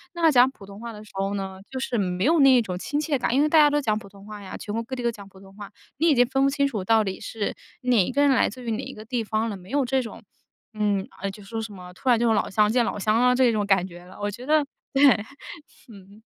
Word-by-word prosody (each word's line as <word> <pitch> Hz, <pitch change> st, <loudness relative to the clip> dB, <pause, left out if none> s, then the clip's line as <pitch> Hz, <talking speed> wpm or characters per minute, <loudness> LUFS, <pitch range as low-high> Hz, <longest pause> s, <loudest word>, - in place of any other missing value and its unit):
那 335 Hz, -2 st, +4 dB
讲 250 Hz, 0 st, +6 dB
普 215 Hz, -, -17 dB
通 200 Hz, +1 st, -12 dB
话 235 Hz, -1 st, -7 dB
的 210 Hz, 0 st, -10 dB
时 215 Hz, -, -16 dB
候 195 Hz, +1 st, -1 dB
呢， 190 Hz, -1 st, -5 dB
就 260 Hz, -, -4 dB
是 245 Hz, -2 st, -2 dB
没 180 Hz, -2 st, -1 dB
有 325 Hz, +3 st, +4 dB
那 265 Hz, -3 st, +6 dB
种 185 Hz, -4 st, -4 dB
亲 290 Hz, +8 st, -2 dB
切 300 Hz, -3 st, 0 dB
感。 240 Hz, -, 0 dB
因 280 Hz, -, +4 dB
为 305 Hz, -, +2 dB
大 320 Hz, -, +4 dB
家 295 Hz, -, +7 dB
都 295 Hz, 0 st, +1 dB
讲 215 Hz, -5 st, 0 dB
普 -, -, -13 dB
通 200 Hz, 0 st, -16 dB
话 210 Hz, -1 st, -9 dB
呀， 190 Hz, -, -8 dB
全 210 Hz, -, -7 dB
国 230 Hz, -, -2 dB
各 260 Hz, +3 st, -6 dB
地 250 Hz, -, -5 dB
都 235 Hz, -, +2 dB
讲 200 Hz, -3 st, -12 dB
普 190 Hz, -, -17 dB
通 195 Hz, 0 st, -16 dB
话， 205 Hz, -1 st, -10 dB, 0.3 s
你 325 Hz, -, +2 dB
已 -, -, +5 dB
经 245 Hz, -, +6 dB
分 270 Hz, +2 st, +1 dB
不 275 Hz, -, +4 dB
清 280 Hz, 0 st, +1 dB
楚 215 Hz, -8 st, -4 dB
到 220 Hz, +2 st, +3 dB
底 190 Hz, -1 st, -4 dB
是 220 Hz, -2 st, -4 dB, 0.3 s
哪 245 Hz, -7 st, +3 dB
一 -, -, -3 dB
个 280 Hz, -, +1 dB
人 285 Hz, -, +5 dB
来 255 Hz, -, +3 dB
自 250 Hz, +5 st, -11 dB
于 235 Hz, -, -4 dB
哪 225 Hz, +4 st, -3 dB
一 265 Hz, +1 st, -7 dB
个 215 Hz, -, -10 dB
地 235 Hz, 0 st, -2 dB
方 220 Hz, +1 st, -1 dB
了。 205 Hz, -, -5 dB
没 185 Hz, 0 st, -15 dB
有 280 Hz, -1 st, +1 dB
这 265 Hz, +1 st, +1 dB
种 225 Hz, -, -9 dB, 0.5 s
嗯， 205 Hz, -2 st, 0 dB
哎， 195 Hz, 0 st, -2 dB
就 205 Hz, +1 st, -13 dB
说 225 Hz, +3 st, -5 dB
什 215 Hz, -2 st, -7 dB
么， 180 Hz, -1 st, -11 dB
突 255 Hz, +7 st, -3 dB
然 235 Hz, -, +5 dB
就 235 Hz, -1 st, +2 dB
老 210 Hz, -, +1 dB
乡 210 Hz, +1 st, +2 dB
见 240 Hz, 0 st, +2 dB
老 205 Hz, -, -3 dB
乡 215 Hz, +3 st, +2 dB
啊， 250 Hz, 0 st, +4 dB
这 255 Hz, -2 st, +4 dB
种 210 Hz, -2 st, 0 dB
感 195 Hz, -2 st, +2 dB
觉 175 Hz, 0 st, -13 dB
了， 185 Hz, -, -14 dB
我 205 Hz, -, -1 dB
觉 245 Hz, +4 st, -9 dB
得， 305 Hz, +1 st, +3 dB, 0.3 s
对， 275 Hz, +1 st, +3 dB, 0.9 s
嗯。 200 Hz, +2 st, -16 dB
220 Hz, 325 characters per minute, -24 LUFS, 200-260 Hz, 0.9 s, 家